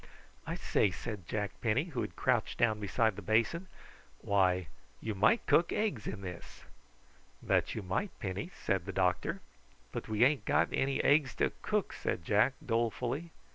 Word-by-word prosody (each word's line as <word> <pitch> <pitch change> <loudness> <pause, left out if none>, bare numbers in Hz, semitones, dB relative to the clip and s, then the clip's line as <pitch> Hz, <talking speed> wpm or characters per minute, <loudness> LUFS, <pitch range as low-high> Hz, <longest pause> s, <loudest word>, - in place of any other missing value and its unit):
"I - - -2
say," 100 - +2
said 95 -1 -6
Jack 105 -2 -2
Penny, 120 +5 +2
who 170 -3 -4
had - - -5
crouched 125 -4 +1
down 110 -3 +2
beside 110 +1 +1
the - - -7
basin, 115 +12 +1 0.5
"why, 95 -1 +2 0.3
you 110 - -3
might 110 - +3
cook 170 - +4
eggs 180 - -1
in 100 0 -4
this." 90 -3 -9 0.8
"That - - +1
you 110 - -4
might, 95 - -1
Penny," 100 - -3
said 95 -1 0
the 95 - -4
doctor. 90 -1 0 0.5
"But - - -5
we 110 +1 +3
ain't 140 +2 +3
got - - +3
any 135 0 +1
eggs 145 -2 +4
to - - +1
cook," - - -1
said 85 - -3
Jack 105 +7 +3
dolefully. 120 +7 -1
110 Hz, 165 wpm, -32 LUFS, 95-135 Hz, 0.8 s, cook